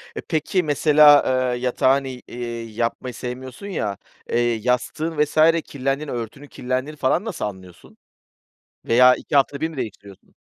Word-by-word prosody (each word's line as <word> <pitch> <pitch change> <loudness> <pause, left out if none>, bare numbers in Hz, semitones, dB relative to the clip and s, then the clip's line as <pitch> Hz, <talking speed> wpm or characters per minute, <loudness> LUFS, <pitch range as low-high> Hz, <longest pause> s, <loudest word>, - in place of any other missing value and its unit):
E, - - -4
peki, 165 +3 -1
mesela, 150 -1 +6 0.3
eee, - - -5
yatağın, 130 +2 +2
i 130 -2 -7
eee, 120 -1 -6
yapmayı 120 +2 -3
sevmiyorsun 125 - -7
ya, 105 - -3 0.3
eee, 120 0 +1
yastığın 125 +8 -2
vs. 150 +1 -7 0.3
kirlendiğini, 140 +2 -3
örtünün 120 +4 -6
kirlendiğini 130 +4 -4
falan 145 +9 +1
nasıl 220 -6 -4
anlıyorsun? 95 -4 -10 0.9
Veya 125 +2 +6
2 - - -5
hafta 140 0 +3
da - - -19
bir 160 - 0
mi 160 - -11
değiştiriyorsun? 100 -4 -8
130 Hz, 150 wpm, -22 LUFS, 120-150 Hz, 0.9 s, mesela